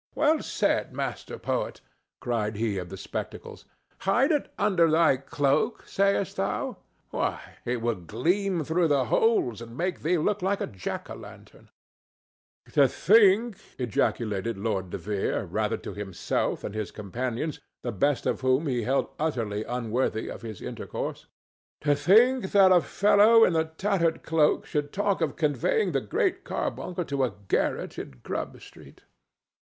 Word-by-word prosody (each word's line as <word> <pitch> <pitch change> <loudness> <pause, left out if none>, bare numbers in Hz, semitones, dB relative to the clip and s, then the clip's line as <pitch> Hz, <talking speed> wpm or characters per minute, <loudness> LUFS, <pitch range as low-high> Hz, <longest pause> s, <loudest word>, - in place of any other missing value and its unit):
"Well 305 +3 +3
said, - - 0
Master - - -4
Poet!" - - -2 0.4
cried 115 -4 -1
he 105 -2 -1
of 90 -1 -7
the - - -7
spectacles. - - -7 0.3
"Hide 240 - +2
it 295 -3 0
under 185 -5 +3
thy 155 -3 +4
cloak, 140 - 0
sayest 200 -2 +1
thou? - - -2 0.3
Why, - - -1 0.3
it 120 -1 -2
will 120 0 +2
gleam 165 - -1
through 165 +3 +2
the 140 -4 +2
holes 125 - +2
and 115 +1 -10
make 180 +3 -2
thee 175 +3 +2
look 205 +5 0
like 195 +2 0
a - - -1
jack 95 -3 -5
o' - - -3
lantern!" - - -13 1.0
"To 140 -2 +6
think," 210 - +4 0.2
ejaculated 115 -2 -1
the 95 - -10
lord 95 -4 -1
De - - -4
Vere, 105 -2 -2
rather - - -1
to - - -8
himself 100 -3 -2
than - - -5
his 110 -3 -3
companions, 125 - -4 0.2
the 120 - -2
best 140 +6 +1
of - - 0
whom 130 +4 +2
he 125 -4 0
held 130 +5 +1
utterly 115 -9 -1
unworthy 120 -1 -1
of - - -8
his 110 -5 -8
intercourse—"to 145 -1 -5
think 220 - +4
that 195 -2 +7
a 180 -1 +6
fellow 210 +5 +5
in 170 - +1
a 160 0 +2
tattered 165 0 0
cloak 160 -2 +2
should 145 -1 -2
talk 200 -2 0
of 155 -4 0
conveying 155 - +1
the 135 -3 0
Great 105 - 0
Carbuncle 180 -1 -3
to 140 -2 -1
a 120 -7 -1
garret - - -1
in 65 - -9
Grubb - - -4
street! - - -15
145 Hz, 155 wpm, -27 LUFS, 115-190 Hz, 1.0 s, that